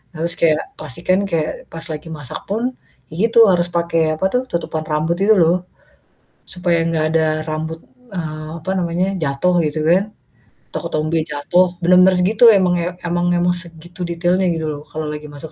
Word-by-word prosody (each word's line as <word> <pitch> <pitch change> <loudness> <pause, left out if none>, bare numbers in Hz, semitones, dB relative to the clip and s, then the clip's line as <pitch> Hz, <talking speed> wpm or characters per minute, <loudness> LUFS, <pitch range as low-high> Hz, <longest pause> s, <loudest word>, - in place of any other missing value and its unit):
Harus 165 +2 -2
kayak 155 -2 +3 0.2
pastikan 170 +6 -1
kayak 160 -2 -2
pas 165 0 -6
lagi 155 0 -6
masak 145 -4 -6
pun 240 +5 -1 0.4
ya - - -10 0.2
gitu, 230 -1 +7
harus 175 -1 +2
pake 165 -2 0
apa 190 - -1
tuh, 250 - +2
tutupan 165 -2 -3
rambut 155 +2 0
gitu 215 +2 +4
loh. 175 +2 +2 0.8
Supaya 175 -2 0
enggak 160 -2 0
ada 160 0 +2 0.2
rambut, 160 +1 -4 0.3
eee, 155 -3 -5
apa 190 - -3
namanya, 175 +1 0 0.2
jatuh 150 +6 +1
gitu 150 +1 -2
kan, 185 +3 +4 0.7
atau - - -2
ketombe 155 +1 -1
jatuh, 160 +4 +2
bener-bener 180 +2 +6
segitu 210 +6 +2
emang 185 -3 +3
ya 175 - -1 0.2
emang 175 +1 0
emang 175 0 +2
segitu 170 0 -9
detailnya 175 +2 +1
gitu 160 -1 -3
loh, 145 0 -6
kalau 155 0 -4
lagi 150 0 -6
masak 145 +2 -9
170 Hz, 170 wpm, -19 LUFS, 155-180 Hz, 0.8 s, gitu